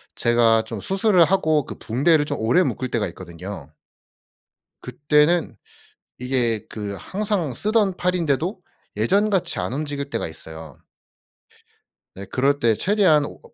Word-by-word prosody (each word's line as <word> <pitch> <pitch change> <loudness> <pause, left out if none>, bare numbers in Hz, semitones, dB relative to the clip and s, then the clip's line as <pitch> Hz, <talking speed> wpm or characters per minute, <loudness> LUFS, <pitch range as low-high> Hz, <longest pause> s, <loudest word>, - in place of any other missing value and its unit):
제가 115 -1 +3
좀 110 -2 -7
수술을 195 -2 +3
하고 160 -5 +1
그 - - -8
붕대를 145 +6 +2
좀 - - -4
오래 120 +12 +3
묶을 130 -6 -3
때가 110 -4 -1
있거든요. 85 -2 -9 1.1
그때는 150 +6 +1 0.6
이게 120 -4 -1
그 105 -2 -5
항상 195 - -2
쓰던 205 - +1
팔인데도 180 +1 -1 0.4
예전같이 195 - +1
안 - - -3
움직일 145 -1 -4
때가 - - -3
있어요. 80 -2 -9 1.3
네. 100 - -9
그럴 140 +2 +1
때 115 -4 +3
최대한 185 - +3
워 - - -10
140 Hz, 255 characters per minute, -22 LUFS, 110-180 Hz, 1.3 s, 제가